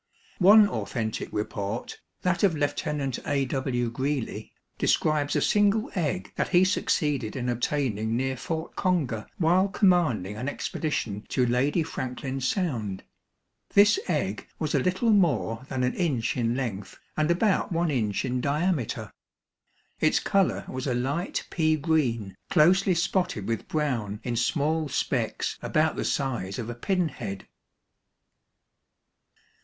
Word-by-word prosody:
One 205 Hz, +3 st, +8 dB
authentic 110 Hz, -, -3 dB
report, 105 Hz, +1 st, -4 dB, 0.2 s
that 180 Hz, -1 st, +1 dB
of 190 Hz, -5 st, +3 dB
Lieutenant 145 Hz, -2 st, -1 dB
A. 140 Hz, -1 st, +1 dB
W. 125 Hz, -3 st, -1 dB
Greely, 130 Hz, -4 st, -3 dB, 0.3 s
describes 150 Hz, -2 st, +2 dB
a -, -, +2 dB
single 205 Hz, +1 st, +2 dB
egg 145 Hz, -, -2 dB
that -, -, +1 dB
he 180 Hz, 0 st, +5 dB
succeeded 145 Hz, -, 0 dB
in 125 Hz, -2 st, -3 dB
obtaining 120 Hz, -3 st, 0 dB
near 130 Hz, +1 st, -1 dB
Fort 160 Hz, +5 st, -4 dB
Conger 150 Hz, -, 0 dB
while 180 Hz, +3 st, +3 dB
commanding 170 Hz, -, +2 dB
an 125 Hz, +5 st, -2 dB
expedition 115 Hz, -, -3 dB
to 125 Hz, -, +2 dB
Lady 135 Hz, +7 st, +2 dB
Franklin 130 Hz, -1 st, -4 dB
Sound. 125 Hz, -, -1 dB, 0.7 s
This 205 Hz, -, +6 dB
egg -, -, -1 dB
was -, -, -2 dB
a -, -, +3 dB
little 185 Hz, +6 st, +1 dB
more 145 Hz, -, +2 dB
than 130 Hz, -1 st, -1 dB
an 125 Hz, -, +1 dB
inch 145 Hz, -11 st, 0 dB
in 120 Hz, -1 st, 0 dB
length 115 Hz, -7 st, -4 dB, 0.2 s
and 155 Hz, +1 st, +1 dB
about 190 Hz, +4 st, +2 dB
one 170 Hz, -1 st, +1 dB
inch 110 Hz, -4 st, 0 dB
in 125 Hz, -1 st, -1 dB
diameter. 150 Hz, -, -1 dB, 0.9 s
Its -, -, +3 dB
color 195 Hz, -2 st, +1 dB
was 130 Hz, +1 st, -4 dB
a 125 Hz, -, 0 dB
"light 140 Hz, +9 st, -2 dB
pea 155 Hz, -2 st, +2 dB
green, 130 Hz, -, 0 dB
closely 185 Hz, +3 st, +4 dB
spotted 170 Hz, -, 0 dB
with 115 Hz, -2 st, -2 dB
brown 120 Hz, -10 st, -1 dB
in 120 Hz, -2 st, -2 dB
small 150 Hz, +5 st, 0 dB
specks -, -, -1 dB
about 155 Hz, +1 st, +1 dB
the -, -, -2 dB
size 120 Hz, -9 st, -2 dB
of 120 Hz, -1 st, -4 dB
a -, -, -4 dB
pinhead." 120 Hz, -, -2 dB
140 Hz, 135 wpm, -27 LUFS, 120-170 Hz, 0.9 s, One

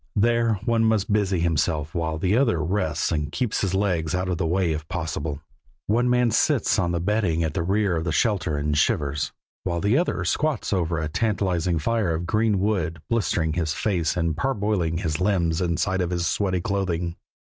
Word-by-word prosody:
There 115 Hz, +1 st, +3 dB
one 115 Hz, -1 st, +2 dB
must 110 Hz, -2 st, +2 dB
busy 100 Hz, -4 st, +1 dB
himself 80 Hz, -2 st, 0 dB
while 80 Hz, -2 st, -1 dB
the 95 Hz, +6 st, +1 dB
other 120 Hz, -9 st, +2 dB
rests 95 Hz, +5 st, -1 dB
and 75 Hz, -1 st, -1 dB
keeps 125 Hz, 0 st, -1 dB
his 95 Hz, -1 st, 0 dB
legs 90 Hz, -5 st, 0 dB
out 90 Hz, 0 st, -1 dB
of 90 Hz, -3 st, -1 dB
the -, -, 0 dB
way 90 Hz, 0 st, +1 dB
if 80 Hz, 0 st, -4 dB
possible. 75 Hz, -1 st, -4 dB, 0.4 s
One 120 Hz, +4 st, +2 dB
man 125 Hz, -1 st, +3 dB
sits 130 Hz, 0 st, +2 dB
on 85 Hz, -3 st, +1 dB
the 85 Hz, -, 0 dB
bedding 90 Hz, -3 st, +1 dB
at 80 Hz, -2 st, -2 dB
the 85 Hz, -, -1 dB
rear 95 Hz, +1 st, +1 dB
of 80 Hz, -, -3 dB
the 85 Hz, -, 0 dB
shelter, 90 Hz, -4 st, +1 dB
and 75 Hz, +1 st, -1 dB
shivers, 75 Hz, -1 st, 0 dB, 0.3 s
while 85 Hz, 0 st, -1 dB
the 105 Hz, -, +2 dB
other 175 Hz, -, -1 dB
squats 150 Hz, -8 st, 0 dB
over 85 Hz, -3 st, 0 dB
a 80 Hz, 0 st, -1 dB
tantalizing 90 Hz, -2 st, 0 dB
fire 100 Hz, 0 st, 0 dB
of 85 Hz, +2 st, -3 dB
green 105 Hz, +2 st, +1 dB
wood, 90 Hz, -6 st, -1 dB
blistering 85 Hz, -8 st, +1 dB
his 80 Hz, -2 st, -1 dB
face 90 Hz, -6 st, 0 dB
and 85 Hz, -2 st, 0 dB
parboiling 100 Hz, -6 st, 0 dB
his 80 Hz, -2 st, -2 dB
limbs 90 Hz, -4 st, +1 dB
inside 90 Hz, +2 st, 0 dB
his 90 Hz, -1 st, -1 dB
sweaty 95 Hz, -2 st, 0 dB
clothing. 90 Hz, -3 st, -2 dB
90 Hz, 190 wpm, -24 LUFS, 80-105 Hz, 0.4 s, There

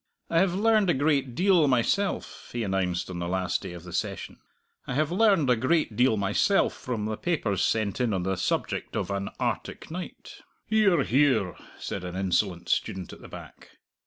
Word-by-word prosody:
"I 165 Hz, -, +4 dB
have 180 Hz, 0 st, +2 dB
learned 215 Hz, -1 st, +3 dB
a 175 Hz, -, +3 dB
great 140 Hz, -3 st, +1 dB
deal 180 Hz, -4 st, +4 dB
myself," 135 Hz, +11 st, 0 dB
he 120 Hz, -1 st, -2 dB
announced 95 Hz, -3 st, -1 dB
on 90 Hz, -, -5 dB
the 85 Hz, -, -3 dB
last 90 Hz, 0 st, -1 dB
day -, -, -7 dB
of 85 Hz, -1 st, -9 dB
the 90 Hz, -2 st, -10 dB
session -, -, -4 dB, 0.5 s
"I -, -, -3 dB
have 155 Hz, +2 st, +1 dB
learned 195 Hz, -6 st, +4 dB
a -, -, +5 dB
great 130 Hz, 0 st, +1 dB
deal 125 Hz, -1 st, +3 dB
myself 100 Hz, -, +2 dB
from 115 Hz, -5 st, -4 dB
the 110 Hz, 0 st, -2 dB
papers 110 Hz, -, -1 dB
sent 110 Hz, +1 st, 0 dB
in 120 Hz, -3 st, +1 dB
on 95 Hz, -3 st, -1 dB
the 95 Hz, +1 st, 0 dB
subject 90 Hz, -, -2 dB
of -, -, -2 dB
an 100 Hz, 0 st, -2 dB
'Arctic -, -, -3 dB
Night.'" 180 Hz, +2 st, -8 dB, 0.2 s
"Hear, 200 Hz, -8 st, +3 dB
hear!" 130 Hz, -, +2 dB, 0.2 s
said -, -, -5 dB
an 90 Hz, 0 st, -6 dB
insolent 95 Hz, -1 st, 0 dB
student 95 Hz, -2 st, -1 dB
at -, -, -13 dB
the -, -, -11 dB
back. -, -, -12 dB
120 Hz, 190 wpm, -27 LUFS, -, 0.5 s, a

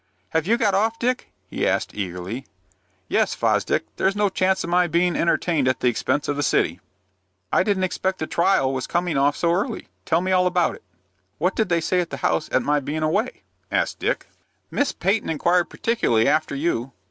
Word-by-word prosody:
"Have 160 Hz, +1 st, 0 dB
you 230 Hz, +3 st, +3 dB
got 210 Hz, -4 st, +2 dB
off, 220 Hz, +4 st, +1 dB
Dick?" 250 Hz, +2 st, -1 dB, 0.2 s
he -, -, -1 dB
asked, -, -, 0 dB
eagerly. 95 Hz, +5 st, -5 dB, 0.6 s
"Yes, -, -, +1 dB
Fosdick. -, -, +1 dB
There's 195 Hz, +1 st, +1 dB
no 205 Hz, -1 st, +2 dB
chance 190 Hz, 0 st, +1 dB
of 170 Hz, -, -5 dB
my 180 Hz, 0 st, +4 dB
being 175 Hz, +1 st, +1 dB
entertained 165 Hz, -4 st, +1 dB
at 130 Hz, -, +1 dB
the 125 Hz, -, +4 dB
expense 145 Hz, +4 st, -1 dB
of 145 Hz, -, 0 dB
the 145 Hz, -, -2 dB
city." 85 Hz, -, +1 dB, 0.7 s
"I -, -, +5 dB
didn't 190 Hz, -1 st, +1 dB
expect 185 Hz, +1 st, -1 dB
the 155 Hz, -, -3 dB
trial 155 Hz, -6 st, +2 dB
was 130 Hz, -1 st, -3 dB
coming 175 Hz, -2 st, -1 dB
off 140 Hz, +1 st, +2 dB
so 170 Hz, 0 st, +2 dB
early. 205 Hz, +5 st, -2 dB, 0.2 s
Tell 165 Hz, -, +2 dB
me 185 Hz, +1 st, -1 dB
all 180 Hz, -1 st, +4 dB
about 180 Hz, -1 st, +1 dB
it." -, -, -12 dB, 0.6 s
"What 180 Hz, +5 st, 0 dB
did 220 Hz, -3 st, 0 dB
they 170 Hz, -1 st, +2 dB
say 180 Hz, +3 st, +1 dB
at 170 Hz, -, -5 dB
the -, -, -5 dB
house 155 Hz, -, +1 dB
at 130 Hz, -, +2 dB
my 145 Hz, +2 st, +2 dB
being 150 Hz, +3 st, -3 dB
away?" 205 Hz, +11 st, -1 dB, 0.3 s
asked -, -, 0 dB
Dick. -, -, -1 dB, 0.5 s
"Miss 285 Hz, -, +1 dB
Peyton 205 Hz, +4 st, 0 dB
inquired 175 Hz, +3 st, +2 dB
particularly 120 Hz, -, +1 dB
after 150 Hz, 0 st, +1 dB
you. 135 Hz, -4 st, -1 dB
170 Hz, 200 wpm, -23 LUFS, 145-190 Hz, 0.7 s, I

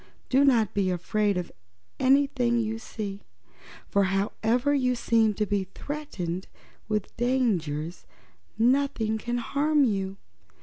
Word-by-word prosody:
Do 265 Hz, +2 st, +4 dB
not 235 Hz, -8 st, +3 dB
be 195 Hz, -2 st, +1 dB
afraid 200 Hz, +3 st, 0 dB
of 180 Hz, -, -4 dB, 0.5 s
anything 265 Hz, -3 st, +3 dB
you 225 Hz, -1 st, -1 dB
see, 205 Hz, -3 st, -6 dB, 0.7 s
for 200 Hz, -1 st, +2 dB
however 220 Hz, +7 st, +1 dB
you 255 Hz, -3 st, +2 dB
seem 225 Hz, -3 st, +2 dB
to 210 Hz, -, 0 dB
be 200 Hz, -1 st, -1 dB
threatened 195 Hz, -, -5 dB, 0.4 s
with 210 Hz, -2 st, -2 dB
dangers, 185 Hz, -, -1 dB, 0.5 s
nothing 235 Hz, -2 st, +2 dB
can 240 Hz, +2 st, -2 dB
harm 290 Hz, +4 st, +2 dB
you. 195 Hz, -5 st, -1 dB
225 Hz, 120 wpm, -27 LUFS, 195-255 Hz, 0.7 s, Do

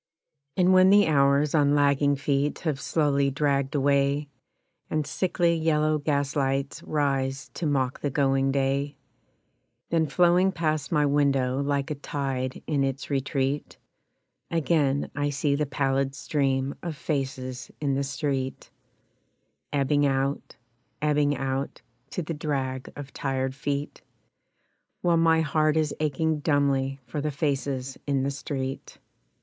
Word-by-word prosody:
And 185 Hz, 0 st, +4 dB
when 185 Hz, 0 st, +7 dB
the 205 Hz, +1 st, +6 dB
hours 140 Hz, -1 st, +3 dB
on 145 Hz, -2 st, +4 dB
lagging 145 Hz, 0 st, +3 dB
feet 140 Hz, +1 st, 0 dB
have 150 Hz, -4 st, -2 dB
slowly 140 Hz, -3 st, +1 dB
dragged 140 Hz, 0 st, 0 dB
away, 140 Hz, +1 st, +2 dB, 0.6 s
And 155 Hz, -1 st, 0 dB
sickly 170 Hz, +2 st, +1 dB
yellow 155 Hz, -2 st, +1 dB
gaslights 140 Hz, -1 st, -1 dB
rise 135 Hz, -2 st, -1 dB
to 165 Hz, -, -3 dB
mock 135 Hz, -3 st, 0 dB
the 145 Hz, -, -1 dB
going 135 Hz, -1 st, +2 dB
day, 140 Hz, +1 st, 0 dB, 0.9 s
Then 165 Hz, -2 st, +2 dB
flowing 180 Hz, +4 st, +3 dB
past 155 Hz, -4 st, -1 dB
my 150 Hz, -3 st, +3 dB
window 140 Hz, -2 st, +2 dB
like 140 Hz, 0 st, -1 dB
a 145 Hz, -1 st, -5 dB
tide 135 Hz, -3 st, -3 dB
in 145 Hz, -3 st, +1 dB
its 135 Hz, +1 st, -3 dB
retreat, 135 Hz, +1 st, -1 dB, 0.7 s
Again 150 Hz, -4 st, +1 dB
I 145 Hz, 0 st, 0 dB
see 140 Hz, +1 st, 0 dB
the 150 Hz, +1 st, 0 dB
pallid 135 Hz, 0 st, 0 dB
stream 135 Hz, -2 st, 0 dB
of 165 Hz, -4 st, -5 dB
faces 130 Hz, -4 st, -3 dB
in 140 Hz, -2 st, 0 dB
the 140 Hz, +1 st, 0 dB
street 140 Hz, -2 st, -3 dB, 1.0 s
Ebbing 145 Hz, +1 st, +2 dB
out, 135 Hz, +1 st, -1 dB, 0.4 s
ebbing 150 Hz, -1 st, +2 dB
out, 135 Hz, +1 st, -3 dB, 0.3 s
To 180 Hz, -, -3 dB
the 165 Hz, -, -4 dB
drag 135 Hz, -4 st, -3 dB
of 140 Hz, -1 st, -9 dB
tired 135 Hz, -1 st, -2 dB
feet, 140 Hz, +1 st, -4 dB, 1.0 s
While 170 Hz, -1 st, +3 dB
my 165 Hz, 0 st, +4 dB
heart 155 Hz, 0 st, +2 dB
is 155 Hz, -2 st, +1 dB
aching 155 Hz, +1 st, 0 dB
dumbly 140 Hz, -2 st, +1 dB
for 135 Hz, +5 st, -4 dB
the 150 Hz, -, -1 dB
faces 140 Hz, -3 st, -2 dB
in 135 Hz, -2 st, +1 dB
the 140 Hz, -, 0 dB
street. 135 Hz, -1 st, -5 dB
140 Hz, 135 wpm, -26 LUFS, 135-150 Hz, 1.0 s, when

